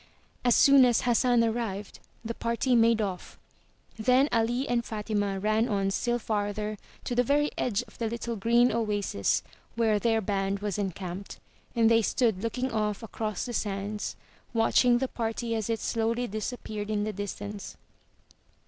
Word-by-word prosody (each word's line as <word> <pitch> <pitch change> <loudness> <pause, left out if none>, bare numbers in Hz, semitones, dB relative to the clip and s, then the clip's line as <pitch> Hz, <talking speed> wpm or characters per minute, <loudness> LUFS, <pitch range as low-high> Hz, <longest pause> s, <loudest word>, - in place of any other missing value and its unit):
As 245 -2 +4
soon 275 -1 +7
as 240 -2 +4
Hassan 240 0 +3
arrived, 220 -3 -3 0.3
the 230 - -2
party 235 +3 0
made 230 -1 +4
off. 185 -3 -5 0.6
Then 255 +5 +4
Ali 240 +4 +1
and 240 -1 +1
Fatima 210 -3 -2
ran 215 +4 +1
on 195 -2 0
still 240 +4 0
farther, 210 -1 -2 0.2
to - - -3
the 245 - +3
very 290 +4 +2
edge 240 -1 0
of - - -19
the 230 - 0
little 235 0 -4
green 235 +4 +3
oasis 205 - 0 0.3
where 220 -2 +2
their 225 0 +2
band 195 -1 -1
was 205 -1 -3
encamped, 190 0 -5 0.4
and 230 -1 +4
they 230 0 +5
stood 220 -3 +1
looking 250 +3 -2
off 215 -1 -1
across 215 -2 -3
the 245 - -5
sands, 205 0 -3 0.4
watching 240 +2 +4
the 265 +2 -1
party 230 -1 -3
as 220 -1 -2
it 225 -1 0
slowly 230 +1 0
disappeared 215 -1 -5
in 210 -1 0
the 215 0 -2
distance. 205 0 -6
225 Hz, 155 wpm, -28 LUFS, 205-240 Hz, 0.6 s, soon